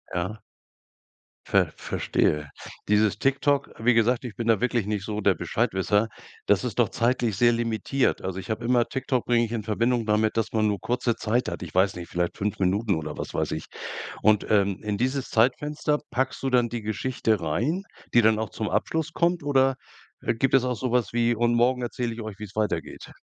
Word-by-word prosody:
Ja. 95 Hz, +5 st, -2 dB, 1.1 s
Ver -, -, +2 dB
Verstehe. 75 Hz, -1 st, 0 dB, 0.4 s
Dieses 105 Hz, -1 st, +2 dB
TikTok, 140 Hz, +1 st, +1 dB
wie 120 Hz, +2 st, +3 dB
gesagt, 115 Hz, +3 st, +2 dB
ich 120 Hz, -4 st, -7 dB
bin 115 Hz, -1 st, -3 dB
da 115 Hz, -1 st, +3 dB
wirklich 120 Hz, -4 st, +1 dB
nicht 105 Hz, -2 st, -2 dB
so 105 Hz, 0 st, -3 dB
der 100 Hz, -2 st, +3 dB
Bescheidwisser, 105 Hz, 0 st, 0 dB, 0.4 s
das -, -, +3 dB
ist -, -, -3 dB
doch -, -, +5 dB
zeitlich 120 Hz, -3 st, 0 dB
sehr 120 Hz, +3 st, +4 dB
limitiert. 115 Hz, +3 st, 0 dB
Also, 95 Hz, 0 st, -4 dB
ich 95 Hz, -, -9 dB
habe 110 Hz, +2 st, -2 dB
immer 120 Hz, 0 st, +3 dB
TikTok 130 Hz, -2 st, -1 dB
bringe 120 Hz, -1 st, +3 dB
ich 115 Hz, -, -8 dB
in 115 Hz, -2 st, -2 dB
Verbindung 115 Hz, +2 st, 0 dB
damit, 110 Hz, +1 st, +1 dB
dass 115 Hz, -, -1 dB
man 110 Hz, -1 st, +2 dB
nur 100 Hz, -2 st, 0 dB
kurze 120 Hz, +2 st, 0 dB
Zeit 120 Hz, +3 st, 0 dB
hat. -, -, -6 dB
Ich 90 Hz, -2 st, -8 dB
weiß 95 Hz, +1 st, +3 dB
nicht, 85 Hz, -1 st, -7 dB
vielleicht 85 Hz, 0 st, -2 dB
5 105 Hz, 0 st, -2 dB
Minuten 100 Hz, +2 st, +1 dB
oder 80 Hz, -1 st, -5 dB
was -, -, -5 dB
weiß -, -, -1 dB
ich. -, -, -4 dB, 0.6 s
Und, 105 Hz, -1 st, +4 dB
ähm, 100 Hz, -2 st, +2 dB
in 105 Hz, -1 st, -2 dB
dieses 130 Hz, +2 st, -1 dB
Zeitfenster 145 Hz, +5 st, +1 dB
packst 130 Hz, +2 st, -1 dB
du 135 Hz, -, 0 dB
dann 120 Hz, -2 st, +3 dB
die 120 Hz, -1 st, -5 dB
Geschichte 110 Hz, 0 st, -1 dB
rein, 125 Hz, -, -1 dB, 0.3 s
die 120 Hz, -, +7 dB
dann 110 Hz, 0 st, +4 dB
auch 110 Hz, -, -3 dB
zum 110 Hz, -, -3 dB
Abschluss 160 Hz, 0 st, -1 dB
kommt 170 Hz, -2 st, +1 dB
oder, 135 Hz, -2 st, +3 dB, 0.5 s
äh, -, -, 0 dB
gibt 135 Hz, +4 st, 0 dB
es 130 Hz, -, +5 dB
auch 125 Hz, -1 st, 0 dB
so 125 Hz, +3 st, -3 dB
was 120 Hz, -4 st, +1 dB
wie: 120 Hz, 0 st, +2 dB
„Und 120 Hz, +1 st, +2 dB
morgen 125 Hz, +2 st, +2 dB
erzähle 120 Hz, -1 st, -2 dB
ich 115 Hz, -, -7 dB
euch, 110 Hz, -2 st, -7 dB
wie's 105 Hz, -1 st, -9 dB
weitergeht.“ 110 Hz, -1 st, -3 dB
115 Hz, 205 wpm, -25 LUFS, 105-125 Hz, 1.1 s, die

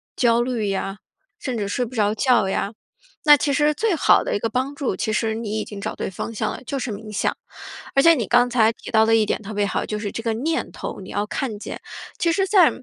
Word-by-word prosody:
焦 235 Hz, -1 st, +3 dB
虑 240 Hz, -4 st, -1 dB
呀， 195 Hz, +1 st, -3 dB, 0.4 s
甚 260 Hz, -, -3 dB
至 205 Hz, -2 st, -2 dB
睡 225 Hz, +5 st, -1 dB
不 245 Hz, +1 st, -7 dB
着 210 Hz, -2 st, +1 dB
觉 240 Hz, -6 st, +3 dB
呀。 195 Hz, +1 st, -1 dB, 0.5 s
那 295 Hz, -1 st, +9 dB
其 285 Hz, -, 0 dB
实 295 Hz, +2 st, +3 dB
最 425 Hz, +5 st, 0 dB
好 -, -, +4 dB
的 -, -, -1 dB
一 -, -, 0 dB
个 230 Hz, -, 0 dB
帮 260 Hz, +5 st, -1 dB
助， 285 Hz, -3 st, -2 dB
其 220 Hz, -, -2 dB
实 220 Hz, 0 st, 0 dB
你 220 Hz, -1 st, -3 dB
已 -, -, -3 dB
经 200 Hz, -2 st, -8 dB
找 -, -, -3 dB
对 -, -, -3 dB
方 190 Hz, +4 st, -5 dB
向 215 Hz, -, -1 dB
了， -, -, -7 dB
就 275 Hz, +1 st, -3 dB
是 250 Hz, -, -3 dB
冥 215 Hz, +1 st, -7 dB
想。 210 Hz, -, 0 dB, 0.6 s
而 275 Hz, -, +5 dB
且 335 Hz, +2 st, +8 dB
你 240 Hz, -8 st, -2 dB
刚 245 Hz, +3 st, +4 dB
才 225 Hz, -2 st, +4 dB
提 -, -, -10 dB
到 220 Hz, 0 st, +4 dB
的 225 Hz, -, +4 dB
一 220 Hz, -1 st, +4 dB
点 -, -, -1 dB
特 210 Hz, +1 st, -7 dB
别 205 Hz, -, +1 dB
好， 200 Hz, -, -1 dB
就 210 Hz, -, -3 dB
是 205 Hz, -1 st, -3 dB
这 230 Hz, -, -5 dB
个 230 Hz, -, +1 dB
念 315 Hz, +8 st, -1 dB
头， -, -, -6 dB
你 190 Hz, -, -10 dB
要 205 Hz, +1 st, -1 dB
看 220 Hz, 0 st, -3 dB
见。 -, -, -7 dB, 0.4 s
其 335 Hz, -, +2 dB
实 385 Hz, +2 st, +1 dB
在， 370 Hz, -6 st, +6 dB
230 Hz, 280 characters per minute, -22 LUFS, 210-270 Hz, 0.6 s, 那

